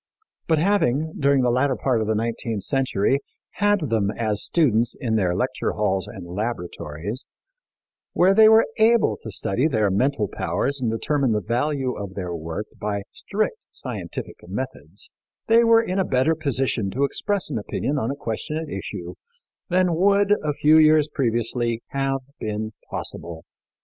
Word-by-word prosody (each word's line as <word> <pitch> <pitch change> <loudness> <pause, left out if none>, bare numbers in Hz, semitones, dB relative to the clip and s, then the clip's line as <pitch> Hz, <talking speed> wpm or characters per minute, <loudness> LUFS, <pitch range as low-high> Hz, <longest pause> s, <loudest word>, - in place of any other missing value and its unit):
But 160 - +3
having, 160 -4 +1
during 140 -2 +3
the 125 - +3
latter 130 +2 +2
part 125 -4 0
of 110 - -2
the 110 - +1
nineteenth 115 -1 -2
century, 135 -2 +1 0.4
had 205 -1 +3
them 105 -3 +2
as 110 -1 -1
students 120 -8 +2
in 115 -5 -1
their 90 -5 +1
lecture 130 +5 -1
halls 95 -3 0
and 95 - -9
laboratories, 90 - -4 0.9
where 185 +2 +4
they 220 +1 +7
were 220 +1 +6
able 230 +1 +4
to 110 - -7
study 105 +7 0
their 110 -9 +1
mental 125 +2 +1
powers 140 +7 -2
and 120 - +1
determine 135 +2 +1
the 105 - +1
value 130 +4 -1
of 100 -2 -7
their 90 -3 -4
work 85 +5 -4
by 100 -1 -2
strict 215 - -3
scientific - - -6
methods, - - -6 0.3
they 230 +1 +5
were 230 0 +5
in 190 -3 -2
a - - +3
better 130 +1 +2
position 135 -8 -1
to 135 +8 -1
express 200 +5 -1
an 115 - -1
opinion 140 +7 -2
on 115 - -1
the 140 - -2
question 140 +4 -4
at 160 -1 -5
issue 90 -3 -6 0.6
than 180 -1 +2
would, 200 +4 +4
a 150 -1 0
few 155 +2 +5
years 155 -1 +5
previously, 120 -2 0
have 135 0 -1 0.2
been 110 0 -3 0.2
possible. 85 -1 -5
130 Hz, 160 wpm, -23 LUFS, 105-155 Hz, 0.9 s, they